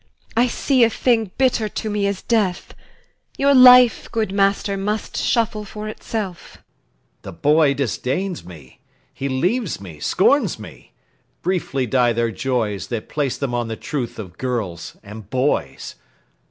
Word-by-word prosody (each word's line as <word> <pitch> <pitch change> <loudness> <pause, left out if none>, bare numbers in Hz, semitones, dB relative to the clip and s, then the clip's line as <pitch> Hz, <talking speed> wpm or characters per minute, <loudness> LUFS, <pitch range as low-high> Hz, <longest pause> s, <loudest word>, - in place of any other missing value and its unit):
I 240 +2 +4
see 255 +1 +2
a 230 - +5
thing 225 -3 +1
Bitter 250 -5 +2
to 220 - -5
me 205 -1 0
as 200 -1 -3
death; 205 -6 0 0.6
your 280 +1 +4
life, 250 -2 +7
good 220 -4 -1
master, 200 0 +1
Must 210 +2 -3
shuffle 230 -2 0
for 210 +1 -7
itself. 215 -4 -5
LUCIUS. - - -22 0.6
The - - -8
boy 150 -1 +3
disdains 140 - -2
me, 75 -8 -14 0.3
He 140 - -4
leaves 180 - -1
me, 85 -6 -11
scorns 215 - +2
me. 85 - -13 0.5
Briefly 170 -7 -1
die 120 0 +2
their 115 0 0
joys 110 -7 -2
That 115 0 -5
place 145 -4 -1
them 140 -4 -3
on 120 -1 -1
the 110 - -4
truth 140 -2 -4
of 95 -5 -9
girls 105 -10 -4
and 105 0 -11
boys. 130 +4 -1
160 Hz, 150 wpm, -21 LUFS, -, 0.6 s, life